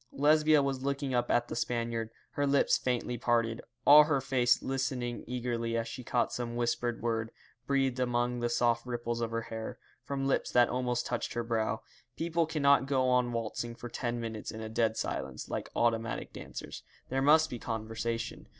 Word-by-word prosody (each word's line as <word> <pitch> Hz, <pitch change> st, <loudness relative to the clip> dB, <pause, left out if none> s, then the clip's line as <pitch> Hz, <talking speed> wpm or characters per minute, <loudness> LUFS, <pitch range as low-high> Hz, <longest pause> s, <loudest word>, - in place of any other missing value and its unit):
Lesbia 150 Hz, +1 st, +4 dB
was 135 Hz, -1 st, -1 dB
looking 140 Hz, 0 st, -2 dB
up 120 Hz, -1 st, +1 dB
at 120 Hz, 0 st, +2 dB
the -, -, -5 dB
Spaniard, 115 Hz, -1 st, -1 dB, 0.2 s
her 145 Hz, 0 st, 0 dB
lips 140 Hz, 0 st, +4 dB
faintly 125 Hz, -1 st, -1 dB
parted, 115 Hz, -1 st, +1 dB, 0.2 s
all 150 Hz, +1 st, +9 dB
her 145 Hz, -2 st, +2 dB
face 125 Hz, -2 st, +2 dB
listening 130 Hz, -2 st, -2 dB
eagerly 120 Hz, -2 st, -2 dB
as 115 Hz, 0 st, -1 dB
she 125 Hz, +2 st, -7 dB
caught 120 Hz, 0 st, 0 dB
some 120 Hz, -1 st, -3 dB
whispered 120 Hz, 0 st, -1 dB
word, 115 Hz, -1 st, 0 dB, 0.4 s
breathed 135 Hz, -2 st, +1 dB
among 120 Hz, 0 st, 0 dB
the 120 Hz, 0 st, 0 dB
soft 120 Hz, 0 st, +2 dB
ripples 120 Hz, -1 st, -2 dB
of 115 Hz, -, -1 dB
her 115 Hz, 0 st, -2 dB
hair, 110 Hz, -1 st, -6 dB, 0.3 s
from 135 Hz, +2 st, -3 dB
lips 135 Hz, -, +1 dB
that 120 Hz, -1 st, +4 dB
almost 125 Hz, -1 st, -1 dB
touched 120 Hz, -1 st, -2 dB
her 120 Hz, -, -1 dB
brow. 110 Hz, -1 st, -1 dB, 0.3 s
People 165 Hz, 0 st, 0 dB
cannot 140 Hz, -3 st, +3 dB
go 130 Hz, -2 st, +2 dB
on 125 Hz, -1 st, +2 dB
waltzing 115 Hz, 0 st, -3 dB
for 120 Hz, +1 st, -8 dB
ten 120 Hz, 0 st, -3 dB
minutes 115 Hz, -2 st, -5 dB
in 110 Hz, -, -6 dB
a 110 Hz, 0 st, -5 dB
dead 110 Hz, 0 st, +1 dB
silence, 65 Hz, -1 st, -4 dB
like -, -, -3 dB
automatic 115 Hz, -1 st, 0 dB
dancers. -, -, -8 dB, 0.3 s
There 135 Hz, +1 st, 0 dB
must 155 Hz, +2 st, +5 dB
be 120 Hz, -, -5 dB
conversation. 115 Hz, +1 st, -4 dB
120 Hz, 180 wpm, -31 LUFS, 115-135 Hz, 0.4 s, all